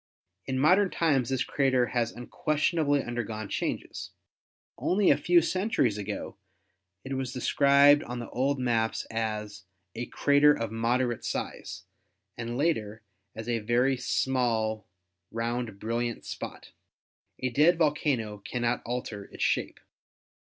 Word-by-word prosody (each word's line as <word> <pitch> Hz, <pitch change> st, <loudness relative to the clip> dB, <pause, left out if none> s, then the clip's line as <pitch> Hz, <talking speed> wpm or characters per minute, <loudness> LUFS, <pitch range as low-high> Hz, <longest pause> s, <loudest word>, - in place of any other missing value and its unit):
In 130 Hz, -, -1 dB
modern 185 Hz, +8 st, +4 dB
times 140 Hz, -10 st, +1 dB
this 130 Hz, -1 st, 0 dB
crater 130 Hz, -3 st, +2 dB
has 120 Hz, -2 st, 0 dB
unquestionably 145 Hz, +3 st, 0 dB
undergone 110 Hz, -3 st, -4 dB
changes. -, -, -3 dB, 0.7 s
Only 195 Hz, +1 st, +3 dB
a -, -, +6 dB
few 175 Hz, -1 st, +4 dB
centuries 170 Hz, -, 0 dB
ago 105 Hz, 0 st, -5 dB, 0.7 s
it 135 Hz, -, -5 dB
was 130 Hz, -1 st, -2 dB
described 140 Hz, +2 st, +5 dB
on 125 Hz, -3 st, -6 dB
the 120 Hz, -, -5 dB
old 135 Hz, +3 st, 0 dB
maps 115 Hz, -3 st, 0 dB
as 105 Hz, -3 st, -3 dB, 0.3 s
"a 120 Hz, +1 st, -5 dB
crater 145 Hz, +1 st, +4 dB
of 115 Hz, -1 st, -4 dB
moderate 120 Hz, +1 st, 0 dB
size" -, -, -5 dB, 0.5 s
and 120 Hz, +1 st, -4 dB
later 110 Hz, -8 st, -1 dB, 0.3 s
as 110 Hz, +1 st, -7 dB
"a 120 Hz, -1 st, 0 dB
very 120 Hz, +5 st, +2 dB
small 120 Hz, -4 st, 0 dB, 0.4 s
round 115 Hz, -2 st, -3 dB
brilliant 115 Hz, +2 st, -2 dB
spot." -, -, -7 dB, 0.7 s
A 130 Hz, -, -1 dB
dead 160 Hz, +7 st, +4 dB
volcano 145 Hz, -9 st, 0 dB
cannot 120 Hz, +3 st, -2 dB
alter 115 Hz, -4 st, -4 dB
its -, -, -6 dB
shape. -, -, 0 dB
125 Hz, 125 wpm, -28 LUFS, 115-140 Hz, 0.7 s, a